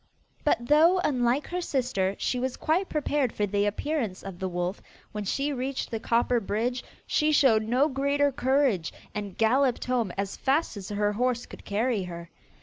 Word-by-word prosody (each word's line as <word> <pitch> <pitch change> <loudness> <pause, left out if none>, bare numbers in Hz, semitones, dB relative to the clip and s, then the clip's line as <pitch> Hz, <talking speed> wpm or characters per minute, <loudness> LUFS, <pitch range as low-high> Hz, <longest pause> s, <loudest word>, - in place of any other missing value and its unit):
But 240 -5 +1
though, 320 +6 +5
unlike 255 0 +1
her 360 +1 -2
sister, 240 - 0
she 250 - -1
was 260 0 -2
quite 355 +5 0
prepared 290 -4 0
for 210 - -1
the 205 +1 +1
appearance 225 -2 -2
of 190 -3 -8
the 190 -1 -2
wolf 180 +2 -3 0.3
when 210 -1 -4
she 280 +8 -1
reached 260 +1 -3
the 225 - -2
copper 235 +2 +2
bridge, 230 +4 -2 0.2
she 305 -1 +2
showed 260 -7 +5
no 245 +6 +2
greater 280 0 +1
courage, 260 - +1 0.2
and 205 -3 -5
galloped 250 +3 +2
home 245 -6 0
as 195 0 -2
fast 280 0 +1
as 195 -2 -7
her 205 0 0
horse 245 +2 0
could - - -12
carry 220 +1 0
her. 170 -1 -8
245 Hz, 175 wpm, -27 LUFS, 205-280 Hz, 0.3 s, though